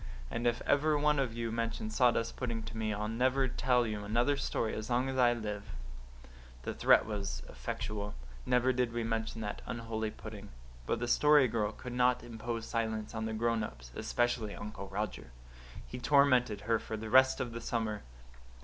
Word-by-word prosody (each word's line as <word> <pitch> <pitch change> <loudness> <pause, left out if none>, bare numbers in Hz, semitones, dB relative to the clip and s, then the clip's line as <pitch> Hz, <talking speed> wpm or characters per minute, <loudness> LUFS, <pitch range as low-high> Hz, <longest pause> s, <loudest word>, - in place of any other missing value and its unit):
And 120 +1 -1
if 120 0 0
ever 150 +1 +3
one 150 0 +3
of 125 -4 -1
you 115 -1 -2
mentions 115 -1 -2
sawdust 120 -2 +3
pudding 115 -3 -3
to - - -7
me 110 -1 -1
I'll 105 +1 -2
never 130 +4 +2
tell 125 -1 +2
you 105 -2 -3
another 120 +7 +2
story 115 -5 -1
as 110 +2 -4
long 125 +2 +2
as 130 - -3
I 120 -1 +6
live." 105 - -5 0.9
The - - -3
threat - - +5
was 100 - -4
effectual. 100 - -4 0.3
Never 125 - +3
did 125 -2 0
we 120 0 -1
mention 115 0 -2
that 105 -1 -4
unholy 115 -1 -3
pudding. - - -9 0.4
But - - +1
the 120 +1 -2
Story 150 +1 +5
Girl 110 -2 0
could 120 +3 -8
not 125 0 +3
so - - -11
impose 115 0 -4
silence 110 -2 -2
on 110 0 -2
the 110 - -2
grown 115 0 +1
ups, - - -8
especially 120 -3 0
Uncle 105 -1 -7
Roger. 100 - -4 0.6
He 125 - -7
tormented 125 -6 +4
her 115 +2 +1
for 110 - -5
the 110 0 -6
rest 130 0 +6
of 125 -2 -2
the 115 0 -6
summer. 110 -3 -2
115 Hz, 185 wpm, -32 LUFS, 110-125 Hz, 0.9 s, I